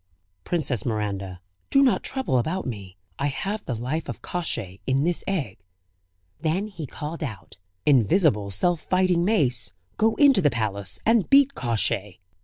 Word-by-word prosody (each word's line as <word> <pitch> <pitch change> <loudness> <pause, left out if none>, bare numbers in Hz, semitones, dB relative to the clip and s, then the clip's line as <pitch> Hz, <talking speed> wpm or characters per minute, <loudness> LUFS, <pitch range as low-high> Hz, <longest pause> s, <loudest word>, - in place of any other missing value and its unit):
"Princess 140 - 0
Miranda, 100 -5 -3 0.3
do 275 - +5
not 260 - +3
trouble 265 - 0
about 170 +10 -2
me. 100 -6 -7 0.2
I 140 - +1
have 200 +9 -3
the 125 - -1
life 130 +8 -3
of - - -7
Kosciey 115 - -3
in 135 +1 +2
this 175 +1 0
egg." 140 - -2 0.8
Then 180 +6 -1
he 165 -7 -7
called 155 +5 -6
out: 110 -8 -7 0.3
"Invisible 125 - +3
self 170 - +1
fighting 185 -2 +2
mace, 135 - +1 0.2
go 220 +1 +3
into 275 -8 +5
the 150 - +4
palace 100 -5 -3
and 225 -3 +3
beat 275 0 +6
Kosciey." 105 - -1
145 Hz, 150 wpm, -25 LUFS, -, 0.8 s, beat